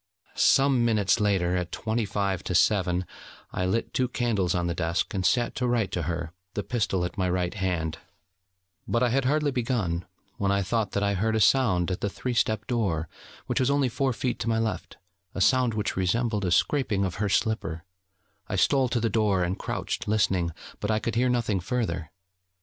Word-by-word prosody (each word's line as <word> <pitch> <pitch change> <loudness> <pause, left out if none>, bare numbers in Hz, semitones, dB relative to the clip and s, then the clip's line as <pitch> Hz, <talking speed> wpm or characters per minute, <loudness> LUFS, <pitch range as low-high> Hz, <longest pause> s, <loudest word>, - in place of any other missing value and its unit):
Some 135 -3 +4
minutes 110 -2 +2
later, 95 -4 +1
at 90 -1 -2
twenty 110 0 -1
five 100 -2 -1
to 90 - -2
seven, 90 -2 +2 0.5
I 90 - -1
lit 115 +5 -1
two 130 - +1
candles 115 -8 0
on 90 -1 0
the 85 - 0
desk, 85 +1 -1
and 95 -2 -1
sat 120 +5 +2
to 125 - 0
write 115 -6 +1
to 90 - -1
her, 85 +1 -3 0.2
the 105 - -1
pistol 100 -6 0
at 90 - -6
my 90 -1 +1
right 90 0 -1
hand; 90 -6 -2 0.9
but 120 +1 +1
I 125 - +3
had 135 +2 +1
hardly 150 +2 +2
begun, 115 -9 -1 0.3
when 100 -1 +1
I 100 0 +1
thought 105 +2 -1
that 100 - 0
I 100 0 +2
heard 110 +4 0
a - - +2
sound 100 -8 +3
at 90 - -3
the 100 - 0
three 125 +5 -4
step 110 -2 +1
door, 95 -10 -1 0.4
which - - -1
was 130 0 +2
only 140 -2 +2
four 135 +3 0
feet 125 0 -2
to 115 - -2
my 110 - +2
left: 110 -1 -3 0.4
a - - -3
sound 125 +2 +3
which 105 - -1
resembled 105 +2 0
a 90 - 0
scraping 105 -3 +2
of 95 0 -4
her 105 - +1
slipper; 95 -6 0 0.7
I - - -1
stole 135 -3 +3
to 120 - 0
the 115 - +1
door, 105 -5 +2
and 90 +2 -1
crouched, - - -3
listening: 95 -5 +2 0.3
but 105 - -3
I 110 - +2
could 115 +1 -2
hear 125 +3 +2
nothing 115 -5 +1
further. 90 -6 -2
105 Hz, 200 wpm, -26 LUFS, 90-120 Hz, 0.9 s, Some